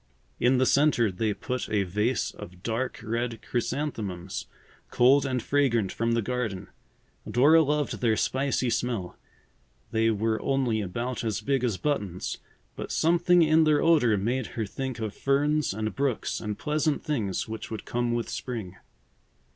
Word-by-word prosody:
In 125 +2 +4
the 130 - +3
centre 135 -6 +3
they 105 +4 -1
put 125 +5 -4
a 105 -2 +2
vase 105 +6 0
of 90 +1 -11
dark 120 +3 -2
red 115 0 -2
chrysanthemums, 110 -8 -3 0.4
cold 135 +3 +4
and 130 -2 -1
fragrant 120 -9 +1
from 115 0 0
the 115 -1 +1
garden. 110 -6 -3 0.6
Dora 150 +7 +6
loved 150 -2 -1
their 115 -3 +2
spicy 130 0 0
smell. 115 -6 -2 0.8
They 115 0 +2
were 110 +1 0
only 130 -5 +1
about 120 +7 -3
as 110 -3 -1
big 135 -2 0
as 115 -6 0
buttons, 100 - -2 0.4
but - - -6
something 175 +1 +4
in 160 +1 +5
their 150 -2 +3
odor 145 -10 +4
made 120 +5 -1
her 110 - 0
think 130 +4 -5
of 110 -3 -4
ferns 145 +2 +1
and 110 +1 -3
brooks 135 -4 -1
and 105 -2 -4
pleasant 150 0 0
things 115 - -2
which 110 0 -6
would 110 - -6
come 120 0 -1
with 120 0 -1
spring. 110 -8 -5
120 Hz, 155 wpm, -27 LUFS, 110-140 Hz, 0.8 s, Dora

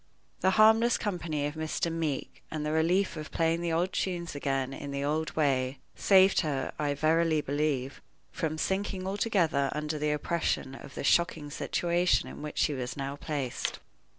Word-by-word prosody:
The 190 - +3
harmless 220 +2 +6
company 165 -8 -2
of 145 - -2
Mr. 160 +1 -2
Meeke, 160 -4 -3
and 155 -1 -3
the 150 - -1
relief 170 +5 +2
of 155 -1 -6
playing 165 +1 +1
the 170 -1 -1
old 175 +3 0
tunes 175 -2 -2
again 135 -2 -1
in 145 +1 -6
the 140 0 -3
old 155 +2 -1
way, 135 -3 +1 0.2
saved 190 -1 +5
her, 140 -5 -2
I 145 -1 0
verily 160 +1 +2
believe, 145 -2 -1 0.3
from 160 -3 -2
sinking 190 +2 -1
altogether 190 -8 +1
under 150 0 -3
the 150 0 0
oppression 150 -2 -1
of 135 +1 -11
the - - -4
shocking 150 -2 +2
situation 175 +3 +1
in - - -9
which 150 0 -6
she 150 - +2
was 125 -1 -4
now 140 0 -3
placed. 145 -4 -3
155 Hz, 170 wpm, -29 LUFS, 145-175 Hz, 0.3 s, harmless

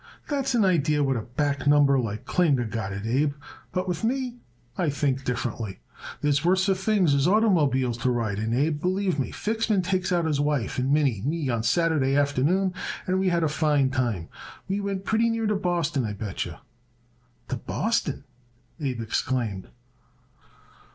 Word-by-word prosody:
That's 270 -3 0
an 220 -4 +4
idee 155 -5 +2
what 135 -2 +2
a 115 - -1
back 140 +4 -2
number 145 -2 +5
like 110 -3 -3
Klinger 145 -9 +2
got 110 -3 -4
it, 100 +2 -5
Abe, 140 +5 +1 0.4
but 185 0 -2
with 180 +4 -3
me 250 +1 -1 0.4
I 175 -4 0
think 140 -2 0
differently. 120 -5 -3 0.4
There's 145 0 +1
worser 190 +3 +3
things 190 -4 +2
as 140 +2 +3
oitermobiles 145 - +2
to 130 - +2
ride 115 -5 -1
in, 110 +1 -2
Abe, 145 +5 +1
believe 185 -2 0
me. 130 - -1
Fixman 220 -3 0
takes 185 +1 -1
out 175 -2 +2
his 150 -3 0
wife 145 -6 0
and 130 +2 0
Minnie 145 -6 +3
and 100 - -7
me 155 -3 -1
on 115 -2 0
Saturday 140 +1 +2
afternoon, 145 +7 +2 0.3
and 185 +1 +1
we 190 0 +2
had 170 -1 +1
a - - +3
fine 150 -3 +2
time. 120 -10 -1 0.4
We 195 +2 -1
went 195 -1 -3
pretty 225 +1 +2
near 225 -1 -1
to 210 0 +1
Boston, 170 -7 0
I 105 -2 -3
bet 100 -2 -4
yer." - - -8 0.9
"To 130 - -1
Boston!" 200 - -1 0.6
Abe 130 -6 -2
exclaimed. 110 -3 -2
145 Hz, 170 wpm, -26 LUFS, 130-185 Hz, 0.9 s, number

